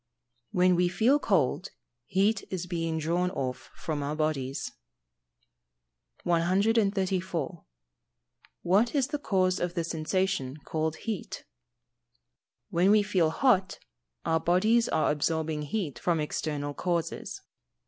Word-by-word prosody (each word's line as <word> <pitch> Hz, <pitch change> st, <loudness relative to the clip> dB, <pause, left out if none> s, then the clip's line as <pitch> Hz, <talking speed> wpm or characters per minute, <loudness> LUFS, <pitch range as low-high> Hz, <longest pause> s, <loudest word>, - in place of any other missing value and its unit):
_ -, -, -55 dB, 0.5 s
When 180 Hz, 0 st, +3 dB
we 175 Hz, 0 st, +3 dB
feel 230 Hz, +10 st, +3 dB
cold, 185 Hz, -, +1 dB, 0.4 s
heat 200 Hz, +2 st, +2 dB
is 185 Hz, -2 st, -3 dB
being 165 Hz, -2 st, -2 dB
drawn 170 Hz, +3 st, 0 dB
off 130 Hz, -8 st, -4 dB
from 155 Hz, -3 st, -3 dB
our 145 Hz, +1 st, -2 dB
bodies. 140 Hz, -4 st, -2 dB, 1.5 s
134. 190 Hz, -, +1 dB, 1.0 s
What 205 Hz, -, +3 dB
is 275 Hz, -1 st, +2 dB
the 295 Hz, 0 st, -2 dB
cause 185 Hz, -7 st, +1 dB
of 175 Hz, 0 st, -2 dB
the 170 Hz, -, 0 dB
sensation 160 Hz, -3 st, -1 dB
called 160 Hz, 0 st, -1 dB
heat? 215 Hz, +3 st, -5 dB, 1.3 s
When 175 Hz, +3 st, +3 dB
we 210 Hz, 0 st, +5 dB
feel 185 Hz, -6 st, +2 dB
hot, 195 Hz, -, +2 dB, 0.5 s
our 160 Hz, 0 st, +2 dB
bodies 215 Hz, +8 st, +3 dB
are 155 Hz, -, +2 dB
absorbing 155 Hz, +1 st, -1 dB
heat 150 Hz, -, -3 dB
from 170 Hz, -2 st, +1 dB
external 150 Hz, -1 st, -2 dB
causes. 170 Hz, +1 st, -2 dB
175 Hz, 115 wpm, -28 LUFS, 155-195 Hz, 1.5 s, we